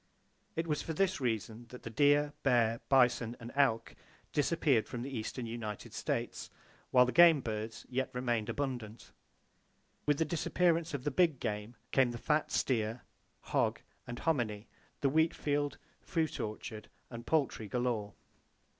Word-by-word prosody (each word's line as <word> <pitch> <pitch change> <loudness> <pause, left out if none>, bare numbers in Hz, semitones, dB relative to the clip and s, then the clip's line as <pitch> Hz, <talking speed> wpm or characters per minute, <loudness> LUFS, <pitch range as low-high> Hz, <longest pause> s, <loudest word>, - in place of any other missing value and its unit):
It 165 - -1
was 150 -3 -1
for 165 - -4
this 190 -1 +1
reason 115 -1 -2
that 125 - -11
the 115 - -6
deer, 145 +4 +4
bear, 115 -3 +2
bison, 125 -3 +3
and 120 0 -8
elk 115 -5 +2 0.4
disappeared 145 -6 +2
from 120 -1 -5
the 135 0 -5
eastern 115 +2 -4
United 115 -3 -6
States - - -3 0.4
while 125 -1 +6
the 125 - -1
game 170 -1 +7
birds 110 -2 -5
yet 130 +1 -1
remained 120 -4 -1
abundant. 120 -6 -4 1.0
With 145 -1 +3
the 160 - +2
disappearance 170 0 +1
of 130 - -5
the 145 - 0
big 160 -2 +3
game 105 +2 -3 0.2
came 130 -2 +4
the 120 - -5
fat 150 +5 +1
steer, 115 -2 0 0.4
hog - - 0 0.3
and 120 -1 -5
hominy, 120 -10 -1 0.3
the 140 - +3
wheat 160 +3 +3
field, 145 -1 -1 0.2
fruit 160 -3 -1
orchard 110 0 -5 0.2
and 115 -1 -8
poultry 135 -8 +1
galore. 115 -3 -1
125 Hz, 150 wpm, -33 LUFS, 115-145 Hz, 1.0 s, game